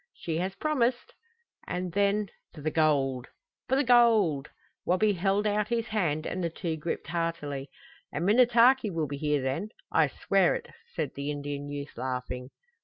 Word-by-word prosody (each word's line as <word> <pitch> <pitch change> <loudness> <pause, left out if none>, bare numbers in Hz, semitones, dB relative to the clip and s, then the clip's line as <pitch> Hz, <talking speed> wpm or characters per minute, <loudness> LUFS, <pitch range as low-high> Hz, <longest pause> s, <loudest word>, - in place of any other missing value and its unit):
"She 160 -2 -3
has 190 +2 -2
promised." 255 -5 0 0.5
"And 180 0 -3
then 205 0 +1 0.3
for 150 - -9
the 155 +2 -1
gold!" 135 -5 +1 0.4
"For 265 - +3
the 275 - +3
gold!" 220 - +4 0.3
Wabi 205 +4 +2
held 195 +3 +1
out 210 0 +1
his 235 0 -1
hand 165 -8 0
and 185 - -3
the 170 - 0
two 165 0 -3
gripped 160 +2 -4
heartily. 165 -5 -3 0.4
"And 170 - -2
Minnetaki 240 +2 +5
will 165 -4 -1
be 140 0 -5
here 150 -2 0
then 135 +11 -2 0.2
I 160 -2 +4
swear 190 +6 +2
it!" - - -6 0.3
said 155 -5 -2
the 140 +1 -4
Indian 145 0 -4
youth, 145 0 -6
laughing. 125 0 -4
170 Hz, 165 wpm, -28 LUFS, 145-210 Hz, 0.5 s, Minnetaki